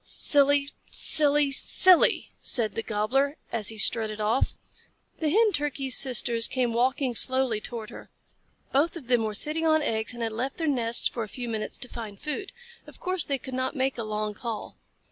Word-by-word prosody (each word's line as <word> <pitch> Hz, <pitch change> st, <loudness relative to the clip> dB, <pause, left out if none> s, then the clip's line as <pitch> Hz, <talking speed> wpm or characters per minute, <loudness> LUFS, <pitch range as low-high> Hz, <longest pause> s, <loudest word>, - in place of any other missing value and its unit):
"Silly 285 Hz, -1 st, +4 dB, 0.2 s
silly 295 Hz, -1 st, +3 dB
silly!" 365 Hz, +5 st, +3 dB
said 225 Hz, -5 st, +1 dB
the -, -, -3 dB
Gobbler, 255 Hz, +8 st, -1 dB
as 220 Hz, -3 st, 0 dB
he 220 Hz, -, -2 dB
strutted 215 Hz, 0 st, +3 dB
off. 215 Hz, +4 st, 0 dB, 0.6 s
The 315 Hz, -, 0 dB
Hen 435 Hz, +6 st, +3 dB
Turkey's 285 Hz, -5 st, -1 dB
sisters 235 Hz, -3 st, +2 dB
came 250 Hz, -3 st, -1 dB
walking 255 Hz, +2 st, 0 dB
slowly 255 Hz, -2 st, +1 dB
toward 230 Hz, -1 st, -7 dB
her. -, -, -12 dB, 0.6 s
Both 310 Hz, +6 st, +1 dB
of 300 Hz, -, -11 dB
them 240 Hz, -3 st, +3 dB
were 215 Hz, -1 st, -3 dB
sitting 315 Hz, +8 st, -1 dB
on 315 Hz, -1 st, +3 dB
eggs, 220 Hz, -1 st, -2 dB
and 235 Hz, -, -5 dB
had 225 Hz, -, -2 dB
left 250 Hz, +5 st, -4 dB
their 330 Hz, -, -2 dB
nests 240 Hz, -5 st, +1 dB
for 240 Hz, -, -5 dB
a 215 Hz, -, -5 dB
few 245 Hz, +2 st, -7 dB
minutes 220 Hz, -2 st, -4 dB
to 250 Hz, -, -4 dB
find 220 Hz, -5 st, -9 dB
food. 390 Hz, +7 st, -5 dB, 0.4 s
Of -, -, -14 dB
course 370 Hz, -3 st, -2 dB
they 275 Hz, -, -1 dB
could 260 Hz, 0 st, -10 dB
not 260 Hz, +3 st, -2 dB
make 265 Hz, -2 st, -1 dB
a -, -, -2 dB
long 215 Hz, 0 st, -3 dB
call. 230 Hz, 0 st, -7 dB
255 Hz, 185 wpm, -26 LUFS, 225-285 Hz, 0.6 s, Silly